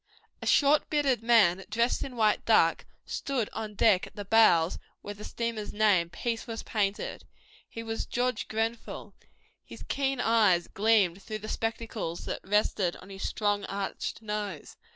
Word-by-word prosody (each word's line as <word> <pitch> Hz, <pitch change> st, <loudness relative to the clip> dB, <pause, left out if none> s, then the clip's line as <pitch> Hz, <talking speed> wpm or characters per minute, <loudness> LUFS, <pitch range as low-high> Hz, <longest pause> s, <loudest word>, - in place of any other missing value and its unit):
A -, -, -5 dB
short, 290 Hz, +1 st, +4 dB
bearded 280 Hz, -6 st, +1 dB
man, 205 Hz, -6 st, +4 dB
dressed 235 Hz, +3 st, +1 dB
in 265 Hz, -2 st, -7 dB
white 215 Hz, -2 st, +2 dB
duck, 165 Hz, -7 st, +3 dB, 0.2 s
stood 260 Hz, -6 st, -2 dB
on 215 Hz, -2 st, -5 dB
deck 200 Hz, -3 st, +3 dB
at -, -, -18 dB
the 205 Hz, -1 st, -6 dB
bows, 185 Hz, -6 st, +4 dB, 0.2 s
where 205 Hz, -, -5 dB
the 205 Hz, +1 st, -11 dB
steamer's 230 Hz, -3 st, -4 dB
name, 205 Hz, -5 st, +3 dB
Peace, 225 Hz, +8 st, -3 dB
was 225 Hz, -1 st, -5 dB
painted. 205 Hz, -2 st, -2 dB, 0.5 s
He 230 Hz, -, -7 dB
was 225 Hz, 0 st, -4 dB
George 250 Hz, -2 st, -1 dB
Grenfell. 225 Hz, +1 st, -3 dB, 0.5 s
His -, -, -11 dB
keen 270 Hz, -2 st, -1 dB
eyes 210 Hz, -7 st, +3 dB
gleamed 200 Hz, -3 st, +2 dB
through 215 Hz, -, -5 dB
the 215 Hz, 0 st, -9 dB
spectacles 225 Hz, -6 st, -4 dB
that -, -, -4 dB
rested 195 Hz, -3 st, +1 dB
on 195 Hz, -, -13 dB
his 195 Hz, 0 st, -4 dB
strong, 205 Hz, -1 st, 0 dB
arched 200 Hz, +3 st, -4 dB
nose. 210 Hz, -6 st, -5 dB
215 Hz, 155 wpm, -29 LUFS, 200-230 Hz, 0.5 s, short